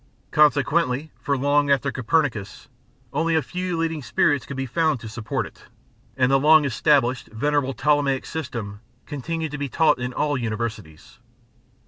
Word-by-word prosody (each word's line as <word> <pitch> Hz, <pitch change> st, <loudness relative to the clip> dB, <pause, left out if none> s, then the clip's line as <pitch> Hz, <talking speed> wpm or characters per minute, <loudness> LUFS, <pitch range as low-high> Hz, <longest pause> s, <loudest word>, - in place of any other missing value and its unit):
Consequently, 150 Hz, 0 st, +2 dB
for 140 Hz, -1 st, 0 dB
long 145 Hz, +2 st, +2 dB
after 140 Hz, 0 st, +2 dB
Copernicus, 125 Hz, -5 st, -1 dB, 0.5 s
only 165 Hz, +3 st, +1 dB
a 160 Hz, -, +2 dB
few 180 Hz, -1 st, -3 dB
leading 165 Hz, -2 st, -1 dB
spirits 140 Hz, +1 st, +1 dB
could 140 Hz, -, -6 dB
be 135 Hz, -, -2 dB
found 155 Hz, +1 st, 0 dB
to 115 Hz, -, -9 dB
support 110 Hz, -1 st, -3 dB
it, -, -, -14 dB, 0.5 s
and 130 Hz, 0 st, +3 dB
the 135 Hz, -, +4 dB
long 155 Hz, +1 st, +6 dB
established 130 Hz, -1 st, +2 dB
venerable 135 Hz, +3 st, -1 dB
Ptolemaic 145 Hz, 0 st, +1 dB
system 115 Hz, -10 st, -5 dB, 0.3 s
continued 160 Hz, +2 st, -4 dB
to 150 Hz, -, -5 dB
be 140 Hz, -1 st, -3 dB
taught 155 Hz, 0 st, +3 dB
in 125 Hz, 0 st, -3 dB
all 145 Hz, +1 st, -1 dB
Universities. 110 Hz, -9 st, -5 dB
140 Hz, 150 wpm, -23 LUFS, 125-150 Hz, 0.5 s, long